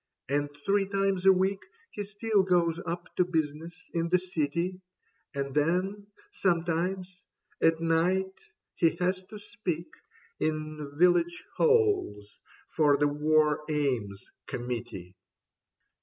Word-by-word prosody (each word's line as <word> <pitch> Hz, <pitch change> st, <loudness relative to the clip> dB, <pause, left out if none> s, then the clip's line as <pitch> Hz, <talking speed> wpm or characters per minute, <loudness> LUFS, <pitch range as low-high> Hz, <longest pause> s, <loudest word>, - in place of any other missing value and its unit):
And 145 Hz, +1 st, 0 dB, 0.2 s
three 200 Hz, 0 st, +2 dB
times 195 Hz, -1 st, 0 dB
a -, -, +10 dB
week 190 Hz, +1 st, +1 dB, 0.3 s
He 205 Hz, -, -4 dB
still 205 Hz, +1 st, +1 dB
goes 175 Hz, -3 st, +2 dB
up 175 Hz, +1 st, -5 dB
to 180 Hz, -, +5 dB
business 165 Hz, 0 st, -3 dB
in 170 Hz, 0 st, 0 dB
the 180 Hz, -, +5 dB
City; 180 Hz, +1 st, -2 dB, 0.5 s
And 140 Hz, -1 st, -3 dB
then, 185 Hz, +7 st, 0 dB, 0.2 s
sometimes, 180 Hz, +1 st, -1 dB, 0.4 s
at 165 Hz, 0 st, +4 dB
night 175 Hz, +4 st, +1 dB, 0.4 s
he 165 Hz, -2 st, +2 dB
has 185 Hz, +1 st, 0 dB
to 215 Hz, -, -9 dB
speak 190 Hz, -6 st, -5 dB, 0.5 s
In 155 Hz, -2 st, -3 dB
Village 175 Hz, 0 st, +3 dB
Halls 410 Hz, -, +2 dB, 0.3 s
for 145 Hz, -3 st, +3 dB
the 145 Hz, +1 st, +3 dB
War 150 Hz, 0 st, +2 dB
Aims 125 Hz, -10 st, -1 dB, 0.2 s
Committee." 120 Hz, -7 st, -5 dB
170 Hz, 115 wpm, -29 LUFS, 150-190 Hz, 0.5 s, a